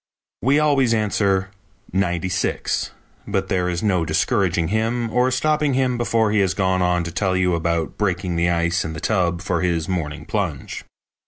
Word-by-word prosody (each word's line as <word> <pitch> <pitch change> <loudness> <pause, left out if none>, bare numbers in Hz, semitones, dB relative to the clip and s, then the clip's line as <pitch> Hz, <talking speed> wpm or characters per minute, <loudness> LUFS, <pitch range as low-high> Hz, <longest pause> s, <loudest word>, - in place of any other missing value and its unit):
We 135 +4 +3
always 140 -6 +3
answer, 100 -3 +1 0.4
"Ninety 90 -2 0
six," 90 +1 -1 0.4
but 95 -1 -1
there 90 -2 +1
is 85 +2 -3
no 95 -5 +2
discouraging 85 0 +1
him 115 +2 -1
or 125 +1 +3
stopping 150 +1 +1
him 130 -1 +1
before 115 -2 +1
he 105 - +2
has 95 -2 +1
gone 95 -1 +1
on 90 -1 +1
to 85 - -5
tell 95 +1 0
you 90 -1 +2
about 85 -1 -1
breaking 90 -3 -1
the 85 +1 +2
ice 85 0 +1
in 80 - -5
the 80 - -6
tub 90 -3 0
for 90 -1 -1
his 85 -3 0
morning 80 -5 -3
plunge. - - -3
95 Hz, 175 wpm, -21 LUFS, 85-110 Hz, 0.4 s, We